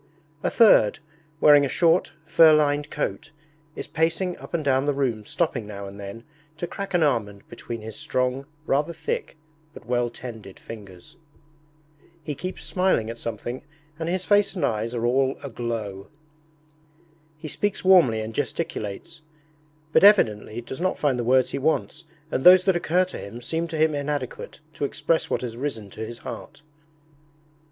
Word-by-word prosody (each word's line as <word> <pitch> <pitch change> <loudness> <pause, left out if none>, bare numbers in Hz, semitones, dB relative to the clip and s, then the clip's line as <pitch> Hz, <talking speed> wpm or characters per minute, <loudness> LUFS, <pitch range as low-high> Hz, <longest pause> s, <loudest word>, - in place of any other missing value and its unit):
A - - 0
third, 200 - +5 0.4
wearing 145 -1 +7
a 140 - 0
short, 165 0 +2
fur 160 0 +6
lined 145 -1 +1
coat, 150 - -3 0.5
is - - -5
pacing 165 +4 0
up - - -11
and 165 -3 -2
down 135 0 +2
the 145 - +1
room 120 -6 -1
stopping 125 -9 -1
now 100 -1 -7
and 100 +1 -10
then 100 +3 -8 0.3
to 175 - -3
crack 195 +1 -5
an 170 - +4
almond 105 -8 -1
between 120 -1 -7
his 110 0 -8
strong, 130 +2 -1 0.2
rather 150 +4 0
thick, 465 - -4 0.4
but - - -12
well 120 0 0
tended 110 -5 -10
fingers. 105 - -12 1.1
He 150 - -4
keeps 185 +6 -6
smiling 180 -12 +1
at 115 - -10
something 115 +3 -5 0.4
and 165 0 -2
his 185 +1 -2
face 205 -1 +3
and 180 - 0
eyes 115 +2 -2
are 120 0 -1
all 130 +2 +2
aglow. 115 -6 -5 1.3
He 155 0 -8
speaks 205 +5 -2
warmly 165 -13 +5
and 110 +1 -6
gesticulates, 120 +2 -4 0.7
but - - +5
evidently 115 - +4
does 130 +6 -8
not 185 +1 0
find 135 -4 +1
the - - -1
words 130 +1 +3
he - - -2
wants 155 +2 -1 0.3
and 130 - -1
those 180 0 +9
that 190 -2 +2
occur 175 +2 +2
to 185 - -8
him 100 +4 -8
seem 165 +7 -2
to 160 -1 -5
him 155 0 +3
inadequate 145 -1 -4
to - - -5
express 155 +3 0
what - - -1
has 120 -2 -5
risen 115 -7 -4
to 110 - -7
his 115 +1 -7
heart. 145 - -9
140 Hz, 165 wpm, -24 LUFS, 115-165 Hz, 1.3 s, those